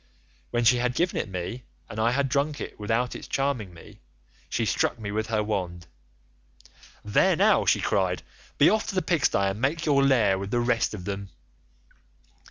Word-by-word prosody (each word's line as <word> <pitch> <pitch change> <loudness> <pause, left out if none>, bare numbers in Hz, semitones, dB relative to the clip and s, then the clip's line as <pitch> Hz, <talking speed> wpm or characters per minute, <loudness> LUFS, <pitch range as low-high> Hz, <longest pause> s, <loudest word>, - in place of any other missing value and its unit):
When 120 0 0
she 120 +2 +5
had 125 0 -1
given 175 +4 0
it - - -3
me, 95 +6 -5 0.3
and 105 - -7
I 115 +2 +3
had 135 +3 +1
drunk 140 +2 -1
it - - -7
without 115 +4 0
its - - -8
charming 135 -8 -1
me, 85 - -15 0.5
she - - -1
struck - - 0
me 105 -3 -5
with 110 +1 -2
her 110 -1 0
wand. 90 -5 -3 1.2
'There 170 - +3
now,' 205 +6 +3
she - - +3
cried, - - 0 0.3
'be - - +6
off 215 -1 +2
to - - -4
the 185 - +1
pigstye, 115 - +2
and 105 +3 -7
make 155 +5 0
your 140 -3 +3
lair 110 -8 +3
with 100 0 -5
the 120 - 0
rest 120 -2 +1
of 90 -4 -9
them. 100 -1 -5
120 Hz, 185 wpm, -26 LUFS, 100-140 Hz, 1.2 s, be